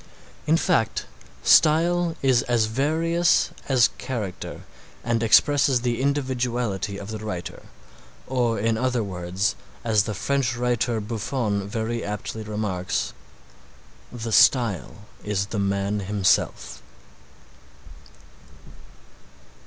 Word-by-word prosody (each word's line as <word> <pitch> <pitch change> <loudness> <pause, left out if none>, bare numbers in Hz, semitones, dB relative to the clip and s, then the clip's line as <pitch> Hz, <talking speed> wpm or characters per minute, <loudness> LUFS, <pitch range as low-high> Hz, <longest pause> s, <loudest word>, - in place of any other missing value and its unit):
In 160 +2 +4
fact 165 - 0 0.4
style 170 +2 +4
is 130 -3 +4
as 120 -2 +3
various 160 +8 +1 0.2
as 130 -3 +5
character 110 -8 -5 0.4
and 115 -1 0
expresses 135 +3 +4
the 120 0 -1
individuality 125 -7 -1
of 100 0 -8
the 110 - -5
writer, 100 -5 -6 0.6
or 120 -3 0
in 110 +2 0
other 125 -2 0
words, 90 0 -2 0.3
as 110 -3 +2
the 105 - -4
French 130 +2 -1
writer 120 -1 0
Buffon 105 -1 -2
very 115 +2 -3
aptly 105 +2 -5
remarks, 105 -4 -3 1.0
"the 115 -2 -5
style 105 -4 +3 0.2
is 100 -1 -1
the 100 +1 -4
man 100 +1 0
himself." 100 -1 0
115 Hz, 100 wpm, -24 LUFS, 105-130 Hz, 1.0 s, as